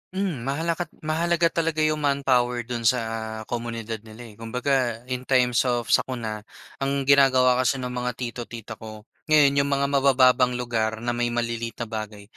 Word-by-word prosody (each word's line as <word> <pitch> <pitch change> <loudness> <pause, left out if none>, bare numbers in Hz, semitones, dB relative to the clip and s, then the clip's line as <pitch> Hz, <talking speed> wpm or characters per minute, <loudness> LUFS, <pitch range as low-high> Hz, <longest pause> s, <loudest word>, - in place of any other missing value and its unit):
Hmm, 175 -11 -2
mahala 160 +5 -1 0.3
mahalaga 170 +2 +1
talaga 165 -2 0
'yong 155 0 +1
manpower 130 -4 +1
do'n 115 -1 -2
sa, 110 -2 -1
komunidad 115 -1 -5
nila 110 +2 -11
eh - - -16
kumbaga 120 0 -1
in 125 0 -4
times 125 -1 +3
of 120 -2 -1
sakuna, 115 -4 0 0.4
ang 140 0 -1
ginagawa 130 -2 +5
kasi 130 +1 +2
ng 125 -2 -4
mga 125 -1 -3
tito, 120 -1 -5
tita 115 -1 -9
ko, 110 -1 -10 0.2
ngayon 145 -2 +5
'yong 140 - +2
mga 140 0 +1
mabababang 130 -2 +4
lugar 115 -2 -2
na 120 - 0
may 120 0 0
maliliit 115 -1 -3
na - - -7
bagay 110 -2 -6
125 Hz, 165 wpm, -24 LUFS, 115-140 Hz, 0.4 s, ginagawa